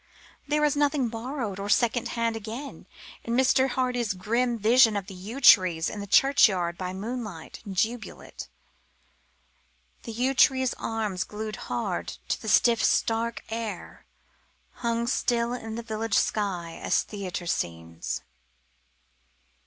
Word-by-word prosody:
There 300 Hz, +1 st, +2 dB
is 295 Hz, -, +1 dB
nothing 290 Hz, -3 st, +1 dB
borrowed 225 Hz, -3 st, -4 dB
or 200 Hz, +1 st, -4 dB
secondhand, 230 Hz, 0 st, +1 dB
again, 225 Hz, +6 st, -7 dB, 0.4 s
in 235 Hz, -, -2 dB
Mr. 260 Hz, 0 st, +4 dB
Hardy's 245 Hz, -4 st, -1 dB
grim 235 Hz, +6 st, 0 dB
vision 225 Hz, 0 st, +5 dB
of 200 Hz, -, -4 dB
the 190 Hz, -, -10 dB
yew 200 Hz, +8 st, -7 dB
trees 185 Hz, -10 st, +6 dB
in 210 Hz, -, -6 dB
the 200 Hz, -, -6 dB
churchyard 195 Hz, -8 st, +4 dB
by 180 Hz, 0 st, -4 dB
moonlight 205 Hz, -4 st, -6 dB
in 195 Hz, -, -6 dB
Jubilate: 225 Hz, +4 st, -3 dB, 1.5 s
The 230 Hz, -, -7 dB
yew 250 Hz, +4 st, 0 dB
tree 260 Hz, 0 st, +4 dB
arms, 210 Hz, -5 st, -2 dB
glued 215 Hz, +2 st, -6 dB
hard -, -, -3 dB
to -, -, -1 dB
the -, -, -4 dB
stiff, 235 Hz, -2 st, +4 dB
stark 230 Hz, 0 st, +1 dB
air, 225 Hz, -5 st, -6 dB, 0.7 s
Hung 235 Hz, -1 st, -1 dB
still 235 Hz, -1 st, 0 dB
in 225 Hz, -3 st, -5 dB
the 235 Hz, -, -5 dB
village 220 Hz, -1 st, -2 dB
sky 180 Hz, -6 st, -1 dB
as -, -, +2 dB
theatre 190 Hz, -4 st, -6 dB
scenes. 85 Hz, -, -3 dB
225 Hz, 130 wpm, -26 LUFS, 195-245 Hz, 1.5 s, trees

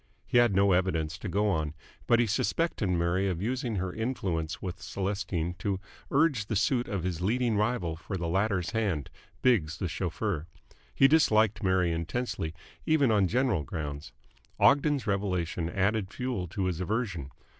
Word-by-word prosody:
He 120 Hz, -, +3 dB
had 120 Hz, -5 st, +4 dB
no 100 Hz, 0 st, +4 dB
evidence 85 Hz, -3 st, +1 dB
to -, -, -5 dB
go 105 Hz, +2 st, +1 dB
on, 80 Hz, -3 st, -1 dB, 0.3 s
but 120 Hz, -, +5 dB
he 120 Hz, -, +4 dB
suspected 115 Hz, -, 0 dB
Mary 90 Hz, +2 st, +1 dB
of 90 Hz, -3 st, -2 dB
using 120 Hz, +2 st, -2 dB
her 95 Hz, -1 st, -2 dB
influence 95 Hz, -9 st, -2 dB
with 90 Hz, -2 st, -6 dB
Celestine 95 Hz, -3 st, -2 dB
to 95 Hz, 0 st, -1 dB, 0.3 s
urge 140 Hz, -8 st, +2 dB
the 110 Hz, -, -2 dB
suit 120 Hz, +5 st, +1 dB
of 100 Hz, -5 st, -3 dB
his 90 Hz, -2 st, -2 dB
leading 115 Hz, +4 st, +1 dB
rival 105 Hz, -6 st, 0 dB
for 95 Hz, +3 st, -5 dB
the 85 Hz, -1 st, -3 dB
latter's 95 Hz, 0 st, 0 dB
hand, 100 Hz, -, -1 dB, 0.3 s
Biggs 85 Hz, -12 st, +3 dB
the 90 Hz, -, -2 dB
chauffeur. 90 Hz, 0 st, -2 dB, 0.5 s
He 135 Hz, -, +6 dB
disliked 110 Hz, -8 st, +4 dB
Mary 95 Hz, -3 st, +2 dB
intensely, 85 Hz, 0 st, -3 dB, 0.3 s
even 145 Hz, -6 st, +3 dB
on 100 Hz, -3 st, +4 dB
general 120 Hz, -, +1 dB
grounds. 75 Hz, 0 st, -5 dB, 0.5 s
Ogden's 145 Hz, -3 st, +4 dB
revelation 90 Hz, -5 st, -1 dB
added 100 Hz, +1 st, 0 dB
fuel 125 Hz, -8 st, -3 dB
to 95 Hz, +3 st, -2 dB
his 90 Hz, -3 st, -1 dB
aversion. 95 Hz, -, -2 dB
95 Hz, 160 wpm, -29 LUFS, 85-115 Hz, 0.5 s, He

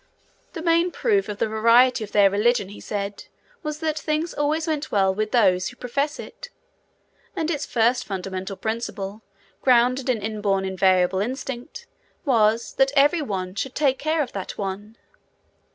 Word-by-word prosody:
The 325 Hz, -, -6 dB
main 335 Hz, +1 st, +3 dB
proof 405 Hz, +1 st, 0 dB
of 205 Hz, -, -4 dB
the -, -, 0 dB
verity 230 Hz, +3 st, +4 dB
of 210 Hz, -, -9 dB
their 200 Hz, -2 st, +5 dB
religion, 210 Hz, 0 st, +1 dB
he 205 Hz, -, -11 dB
said, 200 Hz, -1 st, -4 dB, 0.4 s
was 300 Hz, -3 st, -4 dB
that 310 Hz, -1 st, -1 dB
things 310 Hz, +2 st, -2 dB
always 305 Hz, +2 st, 0 dB
went 310 Hz, -2 st, -2 dB
well 190 Hz, -2 st, +3 dB
with 215 Hz, +2 st, -2 dB
those 190 Hz, -6 st, +3 dB
who 245 Hz, -, -8 dB
profess 280 Hz, +5 st, -2 dB
it; -, -, -10 dB, 0.9 s
and 330 Hz, -2 st, -1 dB
its 295 Hz, -3 st, -3 dB
first 240 Hz, +1 st, +2 dB
fundamental 190 Hz, 0 st, -5 dB
principle, 220 Hz, -2 st, -4 dB, 0.4 s
grounded 255 Hz, +1 st, +3 dB
in 250 Hz, -, +2 dB
inborn 205 Hz, -2 st, -1 dB
invariable 190 Hz, -1 st, +2 dB
instinct, 260 Hz, -, -5 dB, 0.4 s
was, 230 Hz, -3 st, +2 dB
that 270 Hz, 0 st, +4 dB
every 295 Hz, +4 st, +4 dB
One 185 Hz, -8 st, -3 dB
should 255 Hz, +6 st, -4 dB
take 275 Hz, -3 st, +2 dB
care 310 Hz, +1 st, +1 dB
of 265 Hz, -, -8 dB
that 195 Hz, -2 st, -6 dB
One. 205 Hz, +3 st, -5 dB
235 Hz, 160 wpm, -23 LUFS, 200-290 Hz, 0.9 s, their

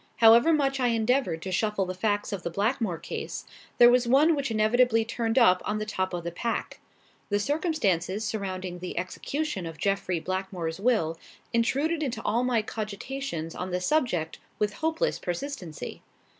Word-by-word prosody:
However 230 Hz, +6 st, +7 dB
much 275 Hz, -3 st, +2 dB
I 250 Hz, -, +2 dB
endeavoured 230 Hz, -7 st, +1 dB
to 190 Hz, -, -4 dB
shuffle 210 Hz, +1 st, 0 dB
the 185 Hz, -, -4 dB
facts 205 Hz, +2 st, -1 dB
of 195 Hz, -, -3 dB
the 170 Hz, -, -3 dB
Blackmore 205 Hz, 0 st, 0 dB
case, -, -, -6 dB, 0.3 s
there 240 Hz, 0 st, +8 dB
was 245 Hz, -1 st, +3 dB
one 290 Hz, +7 st, +5 dB
which 280 Hz, -3 st, -1 dB
inevitably 225 Hz, +1 st, +3 dB
turned 230 Hz, +1 st, -2 dB
up 185 Hz, -8 st, +6 dB
on 210 Hz, -, -1 dB
the 215 Hz, -, -3 dB
top 185 Hz, -3 st, -2 dB
of 175 Hz, -1 st, -4 dB
the 170 Hz, -, -3 dB
pack. 230 Hz, +7 st, -3 dB, 0.5 s
The 205 Hz, -, +2 dB
circumstances 215 Hz, -, 0 dB
surrounding 185 Hz, -4 st, -4 dB
the 180 Hz, 0 st, -6 dB
execution 195 Hz, -, -3 dB
of 165 Hz, -1 st, -8 dB
Jeffrey 190 Hz, -1 st, 0 dB
Blackmore's 185 Hz, -1 st, -3 dB
will 195 Hz, -8 st, +1 dB, 0.3 s
intruded 280 Hz, +8 st, +1 dB
into 250 Hz, -7 st, -2 dB
all 235 Hz, +3 st, +1 dB
my 240 Hz, -3 st, +1 dB
cogitations 215 Hz, -, -5 dB
on 185 Hz, -, -4 dB
the 180 Hz, 0 st, -1 dB
subject 180 Hz, -, 0 dB, 0.2 s
with 210 Hz, -1 st, 0 dB
hopeless 320 Hz, -, -1 dB
persistency. 175 Hz, -, -5 dB
215 Hz, 165 wpm, -27 LUFS, 185-250 Hz, 0.5 s, there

